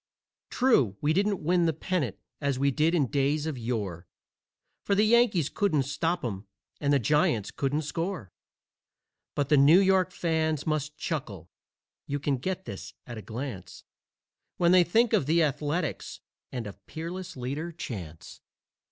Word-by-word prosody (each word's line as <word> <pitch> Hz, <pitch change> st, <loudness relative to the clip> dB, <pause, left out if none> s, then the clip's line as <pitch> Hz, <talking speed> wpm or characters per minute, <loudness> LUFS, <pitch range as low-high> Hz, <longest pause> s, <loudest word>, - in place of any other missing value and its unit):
True, 140 Hz, -, +3 dB
we 150 Hz, +1 st, +1 dB
didn't 200 Hz, 0 st, +1 dB
win 175 Hz, +1 st, +3 dB
the 160 Hz, -, +2 dB
pennant 155 Hz, -, -2 dB, 0.2 s
as 140 Hz, -3 st, 0 dB
we 140 Hz, +1 st, +2 dB
did 155 Hz, +5 st, +2 dB
in 150 Hz, -5 st, +3 dB
days 145 Hz, +3 st, 0 dB
of 160 Hz, -3 st, -2 dB
yore 105 Hz, -8 st, -4 dB, 0.8 s
For 200 Hz, -, +1 dB
the 210 Hz, -, +4 dB
Yankees 220 Hz, -, +4 dB
couldn't 155 Hz, -8 st, +1 dB
stop 165 Hz, +4 st, -1 dB
'em 100 Hz, -3 st, -5 dB, 0.3 s
and 145 Hz, -1 st, +1 dB
the 140 Hz, -, +5 dB
Giants 120 Hz, -4 st, +1 dB
couldn't 145 Hz, +3 st, -1 dB
score, 165 Hz, -, -4 dB, 1.0 s
But 145 Hz, -1 st, 0 dB
the 150 Hz, -, +5 dB
New 145 Hz, +6 st, +7 dB
York 190 Hz, -1 st, +3 dB
fans 160 Hz, -4 st, 0 dB
must 150 Hz, -1 st, -2 dB
chuckle 105 Hz, -, -5 dB, 0.6 s
(you 145 Hz, +1 st, -2 dB
can 140 Hz, -1 st, 0 dB
get 190 Hz, +7 st, -4 dB
this 95 Hz, -1 st, -8 dB
at 120 Hz, -2 st, -7 dB
a -, -, -7 dB
glance) 110 Hz, -6 st, -7 dB, 0.7 s
When 175 Hz, 0 st, +4 dB
they 180 Hz, -1 st, +7 dB
think 225 Hz, +7 st, +2 dB
of 190 Hz, -11 st, +2 dB
the 165 Hz, +2 st, +4 dB
Athletics 150 Hz, +3 st, -2 dB, 0.3 s
and 120 Hz, -3 st, -4 dB
of 100 Hz, -1 st, -10 dB
Peerless 170 Hz, +1 st, -6 dB
Leader 140 Hz, +7 st, -4 dB
Chance. 90 Hz, -, -8 dB
150 Hz, 155 wpm, -28 LUFS, 125-175 Hz, 1.0 s, New